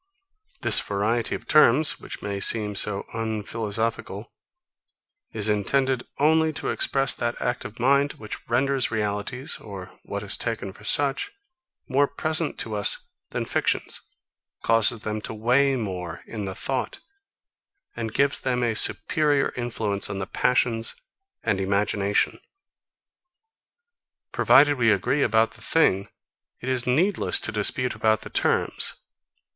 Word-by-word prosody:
This - - +6
variety 110 +3 -1
of - - -10
terms, 150 0 +4
which - - -8
may 100 -1 -3
seem 105 0 +2
so 100 0 0
unphilosophical, 110 -1 -3 1.0
is 110 -1 -1
intended 130 +5 0
only 160 +2 +3
to - - -4
express 135 -2 +2
that 120 0 -3
act 125 0 -2
of 110 - -8
the 120 - -6
mind, 140 +2 +3
which 110 +1 -9
renders 135 +2 +1
realities, 110 +4 -3
or 95 -3 -9
what - - -6
is - - 0
taken 95 - -3
for 105 - -17
such, 140 - +2 0.6
more 140 +2 +2
present 155 +2 -1
to 110 - -5
us 105 -1 +2 0.2
than - - -3
fictions, - - -1 0.6
causes 115 0 +3
them 110 0 -4
to 110 - -6
weigh 130 +5 +3
more 90 -7 -5
in 105 -3 -6
the 95 -1 -5
thought, 135 -1 -3 1.0
and 115 -1 -4
gives 140 0 +2
them 125 -2 -1
a 115 -2 +1
superior 145 +5 +1
influence 110 -5 -1
on 100 - -4
the 95 - -3
passions 115 +1 +2 0.5
and 95 -1 0
imagination. 100 +1 0 1.9
Provided 145 0 +4
we 115 -2 +4
agree 110 +8 +1
about 110 -2 +3
the - - -15
thing, 100 -12 +2 0.5
it 130 - -5
is 125 -2 0
needless 175 +11 +2
to - - -1
dispute 125 +5 0
about 110 0 +1
the - - -9
terms. - - +1
115 Hz, 135 wpm, -24 LUFS, 105-135 Hz, 1.9 s, This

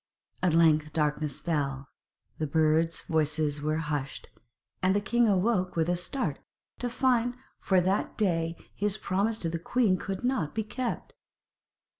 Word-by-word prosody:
At 180 -3 +2
length 155 -2 +4
darkness 150 -2 0
fell; 140 -5 -2 0.5
the 155 - -1
birds' 160 +2 +2
voices 150 -2 0
were 155 +1 0
hushed, 150 -3 -4 0.5
and 185 +1 +3
the - - +4
king 235 +3 +2
awoke 190 -2 +1
with 165 -1 +1
a 175 - +2
start 180 - -2 0.4
to 245 - -2
find 245 -1 +2
that - - -25 0.2
for 190 -2 +3
that 190 +3 0
day 165 -5 0 0.2
his 205 0 0
promise 205 +4 0
to 170 - -1
the 165 - -2
queen 205 +1 +2
could 195 +1 -4
not 245 - 0
be 220 - 0
kept. 240 +3 -4
175 Hz, 155 wpm, -28 LUFS, 155-210 Hz, 0.5 s, length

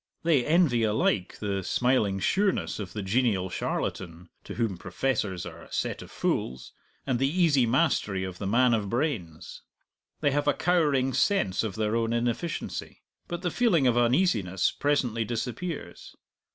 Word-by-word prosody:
They 160 -7 +3
envy 155 -5 +3
alike 105 -4 0
the 100 -2 -2
smiling 110 -4 +1
sureness 195 - 0
of 100 -4 -6
the 105 - -4
genial 95 -3 +1
charlatan 90 -1 -4 0.2
(to - - -7
whom 115 -4 -1
professors 95 0 -2
are 85 -1 -9
a - - -15
set - - -2
of - - -11
fools), 65 +1 -2 0.3
and 130 -3 0
the 135 - +2
easy 150 -7 +3
mastery 115 - +1
of 95 -2 -6
the 100 - -3
man 120 +4 +4
of 105 -3 0
brains. 115 - -3 0.6
They 145 -2 +2
have 145 +1 0
a 145 - +3
cowering 145 -7 +2
sense 105 - +1
of 105 -4 -3
their 110 0 0
own 115 0 0
inefficiency. 120 +7 -3 0.2
But 175 +1 -5
the 175 - 0
feeling 185 - +2
of 125 -2 +3
uneasiness 120 - +2
presently 125 -6 0
disappears. 125 - -5
120 Hz, 155 wpm, -27 LUFS, 95-145 Hz, 0.6 s, man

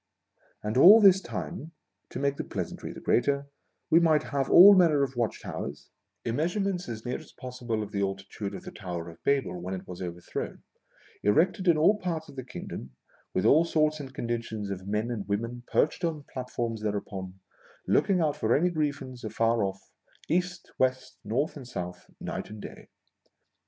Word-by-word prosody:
And 105 +3 -1
all 200 +11 +10
this 195 -3 +7
time, 165 -4 -6 0.4
(to - - -7
make 140 0 0
the - - -2
pleasantry - - -5
the - - -9
greater) 140 +3 +1 0.5
we 165 - +7
might 155 -3 +3
have 140 -2 -2
all 200 +3 +10
manner 165 -7 +5
of 135 -1 -3
watch 120 -3 -1
towers, - - -6 0.3
in 115 +1 -1
measure 175 +7 0
ment 195 -3 -1
as 110 0 -6
near 125 - -2
as - - -15
possible 125 -4 -4
of 105 - -8
the 100 - -1
altitude 100 +1 -4
of - - -8
the - - -8
Tower 85 -3 -6
of 80 - -19
Babel 135 -10 0
when 95 +2 -4
it 95 - -9
was 90 0 -8
overthrown, 85 -1 -5 0.6
erected 170 - +2
in 170 -3 +5
all 200 +7 +4
parts 165 -4 -3
of 140 - -12
the 130 - -5
kingdom, 65 - -8 0.4
with 95 - +1
all 155 +4 +6
sorts 155 -2 +1
and 135 -2 -7
conditions 115 -5 -3
of 95 0 -6
men 105 +3 -1
and 105 -5 -4
women 115 +4 -2
perched 155 +4 +2
on 160 -4 -1
platforms 120 -3 -3
thereupon, 95 -3 -4 0.5
looking 190 -2 +3
out 150 -3 +1
for 110 +2 +2
any 175 +5 +2
grievance 140 -6 -3
afar 115 0 +1
off, 95 0 -5 0.4
East, 180 +1 -1
West, 130 0 0
North, 125 +9 -1
and 135 -5 -9
South, 90 -7 -6
night - - -5
and 105 0 -9
day. - - -10
125 Hz, 185 wpm, -28 LUFS, 105-155 Hz, 0.6 s, all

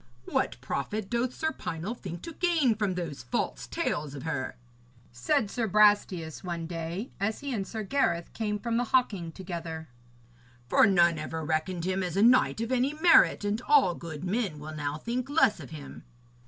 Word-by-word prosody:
'What - - -1
profit 210 -2 -3
doth 240 +1 +1
Sir 315 +4 -2
Pinel 170 - -4
think 175 -6 -8
to 330 - -7
gain 325 -8 +2
from 205 -4 -1
those 165 -7 -4
false - - -3
tales 145 -1 -2
of 135 - -7
her?' 150 -5 -3 0.6
said 120 - 0
Sir 230 -2 -1
Brastias 200 -6 +3
one 170 -2 -4
day, 170 +6 -5
as 215 +5 -1
he 280 -2 -3
and 195 -4 -2
Sir 220 -2 -4
Gareth 175 -8 0
came 210 -2 -2
from 230 +2 -1
the 245 - +1
hawking 205 -10 +1
together. 165 -3 -6 0.8
'For 130 - +5
none 170 -4 +4
ever 160 +1 -4
reckoned 165 +3 -1
him 190 +1 0
as 180 0 -3
a 200 - +4
knight 245 -1 +5
of 230 +2 -3
any 260 +3 +1
merit, 325 -9 +5
and 210 +3 0
all 275 -12 +5
good 165 -2 -7
men 190 -3 -1
will 155 +1 -8
now 145 -1 -3
think 245 - -3
less 270 - +3
of 140 - -9
him.' 150 -3 -9
190 Hz, 180 wpm, -28 LUFS, 160-235 Hz, 0.8 s, For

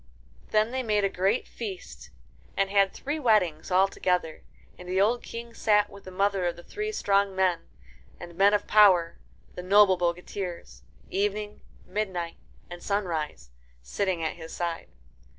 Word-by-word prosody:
Then 215 +1 +2
they 260 0 -1
made 210 -4 +1
a 195 - +2
great 195 +5 0
feast, 185 - -8 0.5
and 195 0 +1
had 200 -1 +3
three 290 +3 -4
weddings 200 - +2
all 190 +1 +4
together, 180 -4 -1 0.3
and 180 0 -11
the 185 +1 +1
old 230 +5 +2
King 235 0 -8
sat 210 -2 +2
with 200 - -13
the - - -8
mother 195 -1 0
of 175 - -2
the 175 - -13
three 425 - -4
strong 200 - +1
men, 185 -3 +1 0.5
and 175 0 -9
men 200 +4 +4
of 205 - -1
power, 185 -6 +5 0.3
the - - -6
noble 195 0 +5
bogatirs, 175 - -4 0.3
Evening, 205 +1 -2 0.2
Midnight, 185 -5 -3 0.3
and 175 0 -9
Sunrise, 170 - -3 0.3
sitting 180 - -2
at 160 - -3
his 160 -1 -9
side. 170 -1 -4
195 Hz, 155 wpm, -27 LUFS, 175-210 Hz, 0.5 s, power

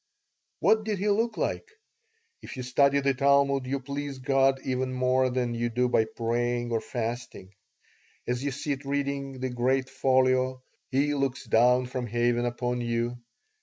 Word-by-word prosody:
What 220 0 +4
did 210 -1 -2
he 205 +3 0
look 225 +2 +1
like? - - -2 0.7
If - - -9
you 130 - -4
study 140 +3 +3
the 140 0 +2
Talmud 140 0 +2
you 135 +1 -1
please 140 +1 -5
God 135 0 +2
even 130 0 -2
more 130 0 +2
than 125 -1 -1
you 120 0 -1
do 125 +2 +1
by 110 -2 +3
praying 120 +2 -2
or 115 -1 0
fasting. 115 -5 -5 0.7
As 125 +2 -1
you 140 - 0
sit 140 +1 -3
reading 140 -1 -3
the 130 - -1
great 130 +2 0
folio 130 -1 +2 0.3
He 140 +2 +1
looks 135 -2 -2
down 125 +2 +4
from 125 -1 -4
heaven 120 +1 +1
upon 120 0 -2
you. 120 +1 -2
130 Hz, 160 wpm, -27 LUFS, 120-140 Hz, 0.7 s, What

